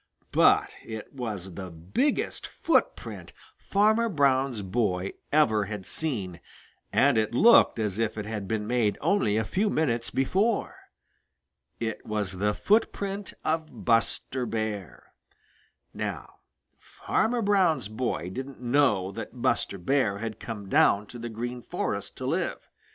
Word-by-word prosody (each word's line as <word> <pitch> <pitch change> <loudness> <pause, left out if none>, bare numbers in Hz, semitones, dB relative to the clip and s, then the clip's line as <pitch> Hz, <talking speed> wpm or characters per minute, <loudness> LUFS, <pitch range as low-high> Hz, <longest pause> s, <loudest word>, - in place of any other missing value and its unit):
But - - +4
it 110 -1 -8
was 105 -8 -5
the 95 +1 -6
biggest 90 - -1
footprint - - -1 0.2
Farmer 220 +3 +2
Brown's 135 - +2
boy 95 -2 -1 0.2
ever 110 -9 +3
had 105 -2 -6
seen, 100 - -3 0.5
and 135 -5 +4
it 110 +2 -1
looked 230 - +6
as 105 -2 -2
if 115 -1 -1
it 105 - -3
had 105 -2 -4
been 105 0 -1
made 115 -3 +1
only 110 - +2
a 110 - +2
few 200 - 0
minutes 120 -10 0
before. 200 - +1 1.0
It 110 -2 -3
was 105 -2 -2
the 105 +2 0
footprint 200 -2 0
of 160 0 -2
Buster 120 +2 +1
Bear. 110 -4 -4 0.8
Now - - -5 0.4
Farmer 235 +1 -1
Brown's 185 - +3
boy 110 -5 -3
didn't 135 +5 -6
know 120 -7 +2
that 115 +4 -8
Buster 115 -4 0
Bear 100 +1 +1
had 110 +1 -5
come 105 -4 -6
down 100 +1 +4
to 120 - -9
the 120 +1 -5
Green 120 +2 -5
Forest - - -4
to - - -5
live. - - -2
115 Hz, 135 wpm, -27 LUFS, 105-145 Hz, 1.0 s, looked